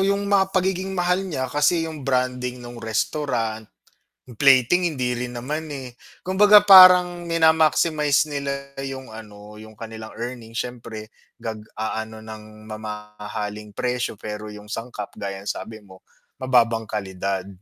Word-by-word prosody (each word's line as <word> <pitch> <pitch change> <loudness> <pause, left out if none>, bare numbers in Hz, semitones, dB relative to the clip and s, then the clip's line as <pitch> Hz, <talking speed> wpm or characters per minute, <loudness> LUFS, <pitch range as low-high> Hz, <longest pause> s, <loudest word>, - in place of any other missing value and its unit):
'yung 200 +1 +1
mga 195 -1 +2
pagiging 190 +1 0
mahal 180 +2 +1
niya, 130 -6 -2
kasi 150 +3 +2
'yung 160 -2 -7
branding 125 -1 -1
nung 120 0 -9
restaurant, 110 -1 -2 0.6
'yung 125 - -12
plating 135 +7 +5
hindi 125 -3 -1
rin 125 0 -5
naman, 150 +5 -4
eh. 130 -4 -7 0.3
Kumbaga 205 +3 +6
parang 180 -2 +8
mina-maximize 160 -3 +3
nila 140 -1 -5
'yung 135 -1 -6
ano, 105 -1 -12
'yung 110 0 -12
kanilang 110 -1 -8
earnings 115 -1 -6
siyempre 115 -3 -6 0.3
nag-aano 110 0 -5
ng 110 -1 -10 0.2
mamahaling 105 -1 -7
presyo, 125 -1 -3
pero 105 0 -6
'yung 105 0 -11
sangkap 110 -1 -6
gaya 100 -1 -5
ng - - -12
sabi 110 -1 -6
mo, 95 -3 -17 0.4
mababang 115 -3 +3
kalidad, 95 -2 -3
125 Hz, 135 wpm, -23 LUFS, 110-150 Hz, 0.6 s, parang